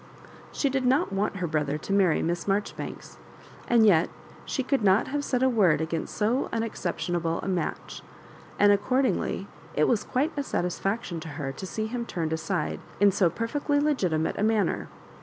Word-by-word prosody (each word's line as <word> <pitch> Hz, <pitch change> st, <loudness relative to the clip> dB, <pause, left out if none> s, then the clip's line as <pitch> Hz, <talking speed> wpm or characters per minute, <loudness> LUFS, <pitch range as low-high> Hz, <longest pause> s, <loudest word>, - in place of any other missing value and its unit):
She 285 Hz, -, 0 dB
did 270 Hz, -1 st, 0 dB
not 250 Hz, -5 st, +2 dB
want, 200 Hz, +1 st, 0 dB
her 180 Hz, -2 st, -2 dB
brother 150 Hz, -2 st, -1 dB
to 195 Hz, -, -4 dB
marry 190 Hz, -5 st, +3 dB
Miss 170 Hz, +1 st, -1 dB
Marjori 200 Hz, +1 st, 0 dB
banks, -, -, -8 dB, 0.5 s
and 235 Hz, -2 st, +5 dB
yet 170 Hz, -6 st, +5 dB, 0.4 s
she 265 Hz, -, -2 dB
could 270 Hz, 0 st, +1 dB
not 195 Hz, +1 st, +4 dB
have 290 Hz, +1 st, -1 dB
said 255 Hz, -2 st, 0 dB
a -, -, +5 dB
word 205 Hz, -11 st, +3 dB
against 160 Hz, 0 st, -3 dB
so 225 Hz, +5 st, +1 dB
unexceptionable 175 Hz, -6 st, -2 dB
a -, -, -4 dB
match; 185 Hz, -2 st, -3 dB, 0.6 s
and 205 Hz, 0 st, +6 dB
accord 250 Hz, +7 st, +2 dB
ingly -, -, -1 dB, 0.3 s
it -, -, +3 dB
was 225 Hz, -4 st, +2 dB
quiie 285 Hz, +6 st, 0 dB
a 285 Hz, -, -1 dB
satisfaction 195 Hz, -4 st, -2 dB
to 160 Hz, -, -8 dB
her 140 Hz, -3 st, -3 dB
to 190 Hz, +8 st, -7 dB
see 215 Hz, +3 st, -3 dB
him 235 Hz, +1 st, -4 dB
turned 160 Hz, -3 st, -2 dB
aside 160 Hz, 0 st, -2 dB, 0.2 s
in 200 Hz, 0 st, +6 dB
so 190 Hz, -3 st, +3 dB
perfectly 285 Hz, -, -1 dB
legitimate 185 Hz, -, 0 dB
a -, -, +1 dB
manner. 215 Hz, -4 st, +1 dB
200 Hz, 180 wpm, -27 LUFS, 170-245 Hz, 0.6 s, and